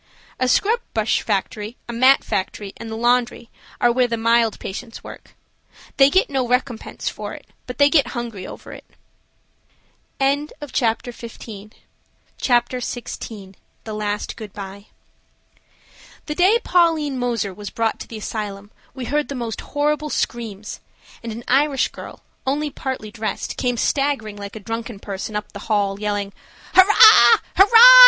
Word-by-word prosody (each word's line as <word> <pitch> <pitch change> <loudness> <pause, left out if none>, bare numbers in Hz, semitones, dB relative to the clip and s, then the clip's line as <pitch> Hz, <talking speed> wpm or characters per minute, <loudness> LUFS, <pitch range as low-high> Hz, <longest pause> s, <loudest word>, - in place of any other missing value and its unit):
A 255 - +1
scrub 430 - +3 0.2
brush 220 -1 +1
factory, 210 +2 -3
a 235 - -5
mat 260 +3 +5
factory, 195 +1 -3
and 230 - -8
the 220 - -5
laundry, 240 0 +1 0.3
are 240 - +4
where 250 +1 +2
the 230 -1 -2
mild 230 -1 +2
patients 225 +4 -7
work. - - -12 0.6
They 270 0 +7
get 375 +6 +3
no 265 -3 -1
recompense 245 -1 -2
for - - -4
it, - - -13 0.2
but 250 - -6
they 285 - +6
get 285 -4 +3
hungry 230 -6 -5
over - - -10
it. - - -10 1.4
CHAPTER 275 -4 -1
XVI. 220 -3 -10 2.1
THE 220 - -6
LAST 210 -1 -3
GOOD 215 -3 -9
BYE. 200 0 -9 1.4
THE 300 - -3
day 370 +7 +4
Pauline 320 -6 +2
Moser 235 -5 -1
was 205 +1 -7
brought 225 +1 -1
to - - -8
the 225 - -8
asylum 205 -1 -5 0.2
we 260 -2 -5
heard 295 +4 0
the 280 - -5
most 235 -3 -4
horrible 300 +1 -1
screams, 220 -6 -4 0.4
and 230 - -6
an 230 +2 -7
Irish 275 +1 +2
girl, - - -11 0.2
only 295 +2 0
partly 260 -6 -5
dressed, 220 0 -4
came 245 -2 -1
staggering 275 -6 0
like 200 0 -8
a - - -6
drunken 225 +2 -5
person 200 +1 -6
up 210 0 -4
the 200 - -8
hall, 200 -2 +1
yelling, 205 -1 -2 0.4
"Hurrah! 375 - +8
235 Hz, 145 wpm, -21 LUFS, 210-270 Hz, 2.1 s, Hurrah